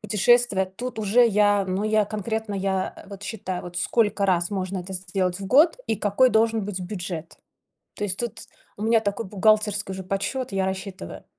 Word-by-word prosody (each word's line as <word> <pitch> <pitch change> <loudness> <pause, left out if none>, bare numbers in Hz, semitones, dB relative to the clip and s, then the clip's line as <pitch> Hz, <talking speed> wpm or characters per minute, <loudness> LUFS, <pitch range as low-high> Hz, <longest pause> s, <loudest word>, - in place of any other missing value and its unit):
Путешествия- 215 0 +3
тут 250 0 -5
уже 220 +3 +4
я, 205 -1 +3
ну, 190 +2 -2
я 215 0 +3
конкретно, 215 +1 -3
я, 190 -1 -1
а, - - -13
вот 200 0 -10
считаю, 190 -4 -4
вот 175 0 -9
сколько 205 0 +1
раз 175 -2 +1
можно 190 -1 -3
это 185 +2 -7
сделать 185 0 -2
в 195 - -6
год 310 - +5
и - - +1
какой 210 +6 +3
должен 220 0 +2
быть 195 -2 -4
бюджет. 175 -3 -6 0.6
То - - -8
есть 190 -2 -3
тут 240 -1 -4 0.4
у 205 - -7
меня 225 +1 +4
такой 205 0 -3
бухгалтерский 210 0 +2
уже 190 0 -5
подсчет, 200 +7 -3
я 195 -1 0
рассчитываю. 190 0 -6
200 Hz, 185 wpm, -24 LUFS, 190-220 Hz, 0.6 s, год